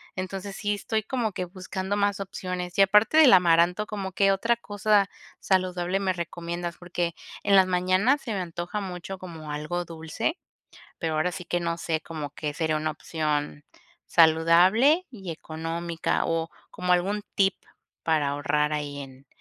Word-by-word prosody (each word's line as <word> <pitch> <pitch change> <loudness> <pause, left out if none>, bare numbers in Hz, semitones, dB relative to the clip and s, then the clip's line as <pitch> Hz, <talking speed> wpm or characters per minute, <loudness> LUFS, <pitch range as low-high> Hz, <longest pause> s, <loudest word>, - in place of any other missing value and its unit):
Entonces, 195 +1 -5
sí 205 -1 -1
estoy 220 +2 -2
como 225 -1 -1
que 180 - -4
buscando 190 +2 -4
más 205 0 +1
opciones. 180 -2 -5
Y 195 - +6
aparte 210 +9 +4
del 300 -6 +8
amaranto, 180 +2 +4
¿como 195 -3 -4
qué 195 +1 +3
otra 230 +5 +2
cosa 205 -2 +1 0.3
saludable 185 0 0
me 190 -1 +1
recomiendas?, 170 0 -5
porque 175 -1 -3 0.3
en 200 - +4
las 190 - +7
mañanas 185 +10 +2
se 230 - -4
me 195 - -1
antoja 175 +4 -4
mucho 185 0 -6
como 160 -4 -8
algo 165 +4 -3
dulce, 160 - -3 0.6
pero 160 -1 -2
ahora 155 +4 +1
sí 180 - -7
que 175 +1 -1
no 170 -1 -1
sé 160 -1 -1
como 155 -3 -6
qué 150 0 -4
sería 160 -1 0
una 155 +1 -1
opción 150 -2 -3 0.4
saludable 180 - +5
y 195 -8 -8
económica 165 +1 -3
o 165 0 -1 0.2
como 180 0 0
algún 200 +4 0
tip 195 -1 +3 0.5
para 155 -3 +2
ahorrar 150 +1 0
ahí 145 -1 -4
en 135 0 -11
180 Hz, 160 wpm, -26 LUFS, 165-195 Hz, 0.6 s, del